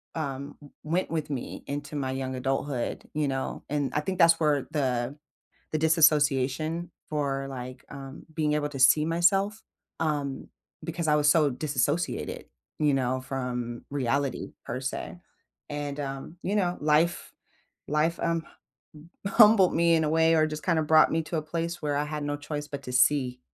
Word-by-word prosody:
um, 140 -3 -4 0.3
went 170 +5 -1
with 155 -2 -2
me 135 -4 -5
into 145 +1 -5
my 135 -2 -1
young 130 0 -3
adulthood, 135 0 -2
you 150 -1 0
know? 135 0 -3
And 145 -1 -1
I 150 - +1
think 185 +4 -4
that's 165 -1 +6
where 150 -3 +2
the 130 -3 -1 0.6
the 155 - +1
disassociation 155 +1 +3 0.2
for, 140 -2 -1
like, 130 -1 -7
um, 135 0 -9
being 150 -1 0
able 150 -1 0
to 145 - -7
see 150 +4 +6
myself, 195 +6 +2 0.4
um, 145 -4 -2 0.4
because 165 -1 -3
I 150 - +4
was 150 -1 +3
so 150 -2 +4
disassociated, 145 +4 -1 0.3
you 150 -2 +3
know, 130 -1 0
from 125 -3 -4
reality 140 -1 -1
per 125 - -3
se. 135 +6 -4 0.5
And, 145 -1 -4
um, 135 +3 -5
you 200 - -1
know, 180 -4 +1
life 155 +3 +2 0.6
life, 155 +3 +1
um, 165 -1 0 0.5
m 155 +3 -15 0.2
humbled 210 -3 +6
me 170 0 +4
in 160 -1 +3
a 150 - 0
way 160 0 +4
or 155 -1 +4
just 155 0 -6
kinda 165 -3 +2
brought 155 +1 +5
me 165 - +2
to 165 - -4
a 155 - -1
place 170 +2 -3
where 145 -1 0
I 145 - +1
had 150 0 -4
no 145 0 -2
choice 145 0 -5
but 140 -1 -6
to 125 - -6
see 125 -1 +3
150 Hz, 170 wpm, -27 LUFS, 135-160 Hz, 0.6 s, that's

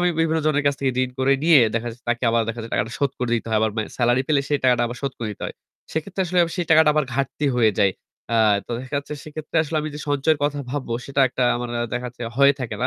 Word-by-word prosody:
আমি 180 - +3
বিভিন্ন 160 0 +1
জনের 145 -1 +2
কাছ 140 - +3
থেকে 135 -1 +1
ঋণ 130 - -2
করে 135 +1 +3
নিয়ে 160 -3 +7 0.2
দেখা 115 +1 -1
যাচ্ছে 120 +2 -14
তাকে 120 +1 -2
আবার 115 0 +2
দেখা 115 +1 -3
যে - - -8
টাকাটা 105 +3 -1
শোধ 140 -2 +1
করে 125 -1 -2
দিতে 115 - -2
হয়। 110 - +3
আবার 110 -1 +2
ম্যা 110 - 0
salary 120 +2 +3
পেলে 145 -3 +3
সেই 145 -1 +1
টাকাটা 125 -2 +4
আবার 120 +1 -6
শোধ 135 -1 -2
করে 115 -2 -3
দিতে - - -12
হয়। - - -7 0.4
সেক্ষেত্রে 180 +5 -3
আসলে 180 +1 0 0.2
সেই 175 -2 -2
টাকাটা 160 -1 +6
আবার 150 - +2
ঘাটতি 140 +2 -1
হয়ে 110 -3 +4
যায়। 95 -2 +4 0.4
আ - - +3 0.3
তো - - -12
দেখা 130 +2 -8
যাচ্ছে 145 +1 -6
সেক্ষেত্রে 155 +1 -6
আসলে 155 +1 -4
আমি 155 - -4
যে 150 - -6
সঞ্চয়ের 145 +2 +2
কথা 145 0 -1
ভাববো 130 -4 -3
সেটা 140 0 -1
একটা 125 - -2
আমার 120 0 -4
অ্যা 120 - -1
দেখা 125 0 -2
যাচ্ছে 120 0 -11 0.2
হয়ে 140 0 +7
থাকে 110 -4 -4
না। - - +3
135 Hz, 270 wpm, -22 LUFS, 120-150 Hz, 0.4 s, নিয়ে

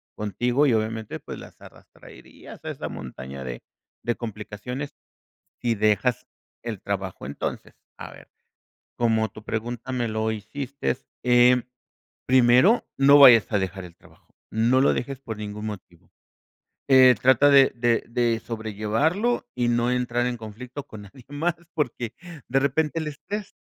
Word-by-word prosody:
contigo. 120 +7 0
Y 130 - +3
obviamente, 110 0 -2
pues, - - -8
las - - -14
arrastrarías - - -15
a - - -3
esa - - -6
montaña 65 +1 -8
de - - -6 0.4
de 120 - -1
complicaciones, 115 +5 -6 0.7
si 120 -1 +1
dejas 110 +4 +1 0.4
el 110 -5 -5
trabajo. 95 -2 -4
Entonces, 70 - -5 0.2
a - - -8
ver, - - -15 0.7
como 110 -2 +1
tu 110 0 -13
pregunta 120 +3 -4
me 120 -2 -1
lo 110 0 -1
hiciste 110 - -4 0.2
em, 125 0 +5 0.6
primero, 130 - +5
no 140 +1 +7
vayas 120 -7 +8
a 105 - +3
dejar 95 0 -4
el 85 -1 -13
trabajo, - - -23 0.2
no 120 +4 +2
lo 140 - +4
dejes 135 +1 -4
por 110 -5 -7
ningún 105 0 -6
motivo. 90 -4 -10 0.8
Eh, 130 -2 +7
trata 130 +3 +5
de 135 -1 +6
de 120 -1 +1
de 115 -1 +1
sobrellevarlo, 115 - -1
y 120 - 0
no 120 +1 +1
entrar 125 -1 0
en 125 -1 -2
conflicto 120 +5 -8
con 105 -2 -10
nadie 115 +5 -15
más, 155 +4 -1 0.2
porque 125 -5 -2 0.3
de 135 +2 +2
repente 150 +3 0
el 155 - -3
estrés 200 +8 -7
120 Hz, 145 wpm, -24 LUFS, 110-130 Hz, 0.8 s, vayas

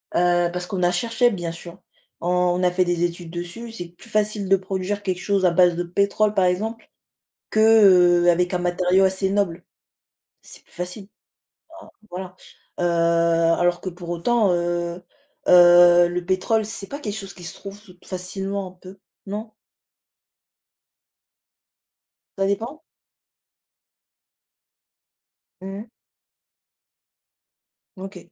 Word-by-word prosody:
heu, 175 0 +2
parce 180 0 -5
qu'on 185 -1 -3
a 175 - +3
cherché 230 +6 +1
bien 175 -6 -4
sûr, 170 +2 -11 0.4
on 180 +1 +1
a 180 - +3
fait 180 0 +1
des 175 0 -1
études 170 -1 -4
dessus. 175 +7 -7
C'est 175 -6 -8
plus 175 +7 -16
facile 210 -2 -1
de 195 - +6
produire 190 +2 -4
quelque 185 -2 -2
chose 200 -2 0
à 175 - +4
base 175 -1 +4
de 175 - -2
pétrole 200 +4 0
par 190 -3 +2
exemple, 220 +6 -2 0.6
que, 215 - +1
heu, 180 -6 +6
avec 180 +1 0
un - - 0
matériau 180 +2 +1
assez 190 0 0
noble. 190 -4 -1 0.8
C'est - - -14
plus - - -27
facile. 180 +3 -7 0.7
Bah - - -16 0.2
voilà, 185 0 -8 0.4
heu, - - -1 0.8
alors 175 0 +1
que 185 - -4
pour 175 -1 -10
autant, 200 +4 +1
heu 175 0 -2 0.5
heu, 175 0 +7
le 175 0 -4
pétrole, 190 +4 0
c'est 205 -2 -7
pas 285 - -7
quelque 210 -8 -5
chose 195 -2 -8
qui 180 - -14
se 175 - -8
trouve 200 +1 -10
toute 180 -4 -19
facilement 195 +1 -5
un - - -11
peu, 185 +1 -14 0.3
non? 215 +3 -6 2.9
Ça 195 - 0
dépend? 230 +10 -3 2.8
Mmh. 195 +4 -8 2.1
OK 190 0 -9
185 Hz, 135 wpm, -22 LUFS, 175-200 Hz, 2.9 s, heu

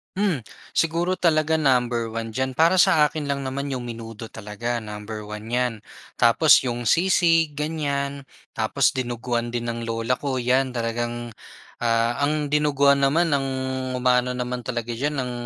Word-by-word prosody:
Hmm, 185 - 0 0.3
siguro 170 +3 +1
talaga 160 -2 +2
number 125 -5 +2
one 115 0 -4
diyan 130 +3 -2
para 165 +6 +4
sa 150 -4 +5
akin 155 -2 -5
lang 140 -1 -2
naman 135 +1 -3
yung 125 - -3
menudo 115 -2 -8
talaga 110 +3 -4
number 105 -1 -7
one 105 +1 -8
'yan. 125 -1 +1 0.5
Tapos 120 +7 +6
yung 120 -1 -3
sisig 165 - +3
ganyan, 140 -2 -2 0.3
tapos 120 +6 +1
dinuguan 120 -2 -2
din 120 0 -3
ng 115 - -6
lola 115 +2 0
ko 135 -3 -1
'yan 130 +2 +2
talagang, 120 0 -3 0.5
ah, 115 +1 +1
ang 150 +1 +1
dinuguan 140 -1 +3
naman 155 +4 +2
ang 140 - +2 0.6
umaano 125 0 +2
naman 125 0 -3
talaga 120 0 -4
diyan 145 +5 -2
ang 125 -2 -2
125 Hz, 150 wpm, -23 LUFS, 120-150 Hz, 0.6 s, Tapos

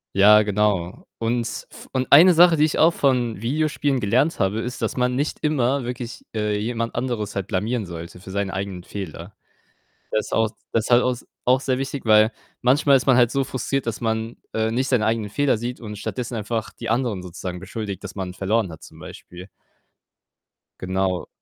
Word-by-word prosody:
Ja, 105 +2 +7
genau, 100 -4 0
und 115 +1 0 0.3
f - - -13
und 130 0 -1
1 170 +6 +9
Sache, 170 -1 +6
die 150 - +4
ich 155 - +1
auch 165 +2 +6
von 120 -6 +1
Videospielen 145 0 0
gelernt 125 +10 +1
habe, 100 +3 +1
ist, 120 +1 -5
dass - - -2
man 125 0 +1
nicht 145 +3 -1
immer 140 -3 +1
wirklich, 120 0 -6
äh, 105 -1 0
jemand 115 +2 -3
anderes 120 -4 -2
halt 100 -2 -2
blamieren 105 +4 -1
sollte 85 0 -8
für 95 +1 -10
seine 100 0 -2
eigenen 95 -2 -4
Fehler. 95 -1 -8 0.7
Das 110 - -1
ist - - -11
auch 110 0 +3
s 105 - -12 0.2
das 115 -1 +1
ist - - -4
halt 120 +1 +6
auch 125 - +2
s 125 - -7 0.2
auch 130 +1 +4
sehr 130 -2 0
wichtig, 135 0 -4
weil 110 +1 +5 0.3
manchmal 135 +3 +4
ist 130 - -4
man 130 - +6
halt 120 -2 +5
so 140 -1 +1
frustriert, 135 0 -2
dass 115 - -2
man, 110 0 -2 0.2
äh, 110 0 0
nicht 130 +3 0
seine 125 -5 +2
eigenen 110 -2 0
Fehler 140 0 +1
sieht 120 +2 -5
und 105 -2 -7
stattdessen 120 +3 -4
einfach 110 +1 -3
die 115 - -6
anderen 115 -5 0
sozusagen 90 0 -6
beschuldigt, 100 0 -6
dass 100 0 -8
man 95 -2 -4
verloren 100 0 0
hat 80 - -12
zum - - -14
Beispiel. 90 +2 -11 1.3
Genau. 95 0 -1
115 Hz, 200 wpm, -23 LUFS, 100-125 Hz, 1.3 s, 1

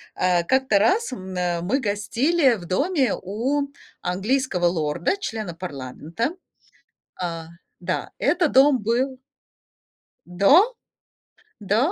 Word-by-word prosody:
Э, 180 -1 +2
как-то 260 0 +2
раз 380 - +2
мэ 180 -4 -3
мы 205 +11 0
гостили 250 +7 +2
в 180 -5 -9
доме 275 - +1
у 260 +9 -1 0.3
английского 195 +1 0
лорда, 170 - 0
члена 220 - -5
парламента, 165 - -4 0.9
э - - +1 0.5
Да, - - -3
это 345 -2 +2
дом 270 0 +5
был 255 +4 0 1.1
До, 275 - +4 0.9
да, 220 - +1
220 Hz, 100 wpm, -23 LUFS, 180-275 Hz, 1.1 s, дом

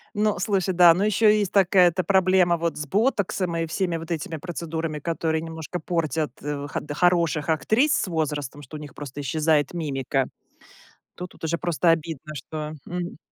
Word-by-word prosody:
Ну, 210 -1 +1
слушай, 190 0 0
да, 175 -1 +8
но 185 +4 0
ещё 215 +1 +3
есть 210 -3 +2
такая, 190 -2 +5
это, 180 +2 -2
проблема 185 -1 +4
вот 170 0 -2
с 150 - -4
ботоксом 195 - 0
и 165 - 0
всеми 170 +1 -1
вот 165 +1 -8
этими 160 0 -3
процедурами, 160 -1 -4
которые 160 0 -1
немножко 165 +1 -6
портят, 160 -3 -1
э, 145 -1 -3
ход - - -4
хороших 170 -2 +2
актрис 220 - +2
с - - 0
возрастом, 150 -4 -3
что 145 +2 -9
у - - -9
них 145 -3 -10
просто 145 -1 -7
исчезает 150 +1 +1
мимика. 135 -5 -1 0.9
Тут 180 0 -7
тут - - -19
уже 165 +1 0
просто 175 0 +1
обидно, 155 -2 -1
что, 150 +3 -6
м 175 0 -4
165 Hz, 175 wpm, -24 LUFS, 150-180 Hz, 0.9 s, да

